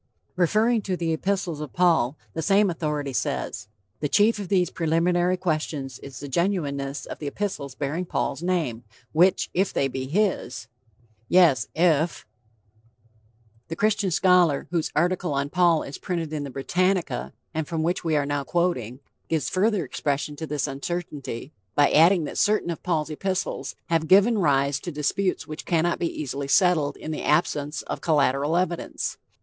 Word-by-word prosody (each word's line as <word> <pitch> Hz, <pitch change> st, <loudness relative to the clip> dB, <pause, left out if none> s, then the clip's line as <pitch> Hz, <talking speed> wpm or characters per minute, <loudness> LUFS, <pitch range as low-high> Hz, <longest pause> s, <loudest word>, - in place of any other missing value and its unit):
Referring 215 Hz, +6 st, +2 dB
to 190 Hz, -2 st, -2 dB
the 165 Hz, -2 st, -1 dB
epistles 180 Hz, -2 st, -2 dB
of 150 Hz, -4 st, -7 dB
Paul, 165 Hz, -6 st, +3 dB, 0.2 s
the -, -, -3 dB
same 200 Hz, +2 st, +3 dB
authority 150 Hz, -4 st, -3 dB
says: -, -, -2 dB, 0.3 s
"The 145 Hz, -, -1 dB
chief 215 Hz, +5 st, +3 dB
of 200 Hz, -, -5 dB
these 180 Hz, -2 st, +2 dB
preliminary 175 Hz, +2 st, +1 dB
questions 155 Hz, -6 st, -2 dB
is 135 Hz, -2 st, -10 dB
the 145 Hz, -, -7 dB
genuineness 140 Hz, -4 st, -1 dB
of -, -, -8 dB
the 150 Hz, -, -5 dB
epistles 140 Hz, -6 st, -4 dB
bearing 150 Hz, +6 st, -2 dB
Paul's 165 Hz, -, -2 dB
name, 165 Hz, -10 st, -1 dB, 0.3 s
which 180 Hz, +4 st, +3 dB
if 190 Hz, +3 st, +1 dB
they 135 Hz, -, +1 dB
be 130 Hz, 0 st, -4 dB
his" 170 Hz, -, -1 dB, 0.6 s
yes, 165 Hz, -11 st, +5 dB
IF 165 Hz, -1 st, +2 dB, 1.4 s
The 165 Hz, -, -5 dB
Christian 210 Hz, 0 st, +1 dB
scholar 180 Hz, -4 st, +3 dB
whose 170 Hz, -3 st, 0 dB
article 175 Hz, -1 st, +1 dB
on 140 Hz, +1 st, -1 dB
Paul 175 Hz, -3 st, +3 dB
is 140 Hz, -, -8 dB
printed 165 Hz, -4 st, -3 dB
in 145 Hz, -2 st, -3 dB
the -, -, -6 dB
Britannica, 180 Hz, +7 st, -1 dB, 0.2 s
and 160 Hz, -2 st, -2 dB
from 160 Hz, -2 st, -2 dB
which 175 Hz, +3 st, -1 dB
we 160 Hz, -2 st, +1 dB
are 145 Hz, -1 st, +2 dB
now 145 Hz, 0 st, -1 dB
quoting, 135 Hz, -7 st, -1 dB, 0.3 s
gives 160 Hz, -2 st, 0 dB
further 195 Hz, -2 st, +1 dB
expression 145 Hz, +2 st, -2 dB
to 160 Hz, -, -5 dB
this 145 Hz, -2 st, -1 dB
uncertainty 140 Hz, -3 st, -5 dB, 0.2 s
by 145 Hz, -1 st, +4 dB
adding 170 Hz, +2 st, +5 dB
that -, -, -4 dB
certain 210 Hz, -4 st, +2 dB
of 165 Hz, -, -6 dB
Paul's 160 Hz, -3 st, -1 dB
epistles 185 Hz, +4 st, -3 dB
"have 165 Hz, -1 st, 0 dB
given 205 Hz, +5 st, +5 dB
rise 140 Hz, -4 st, +2 dB
to 175 Hz, -, -6 dB
disputes 160 Hz, +6 st, -1 dB
which 155 Hz, +1 st, -7 dB
cannot 170 Hz, 0 st, +1 dB
easily 140 Hz, -4 st, -3 dB
be 140 Hz, -, -4 dB
settled 165 Hz, -6 st, +3 dB
in 155 Hz, -, -6 dB
the 155 Hz, -, -4 dB
absence 150 Hz, -1 st, 0 dB
of -, -, -5 dB
collateral 145 Hz, 0 st, +2 dB
evidence... 175 Hz, -2 st, -2 dB
160 Hz, 165 wpm, -25 LUFS, 145-180 Hz, 1.4 s, yes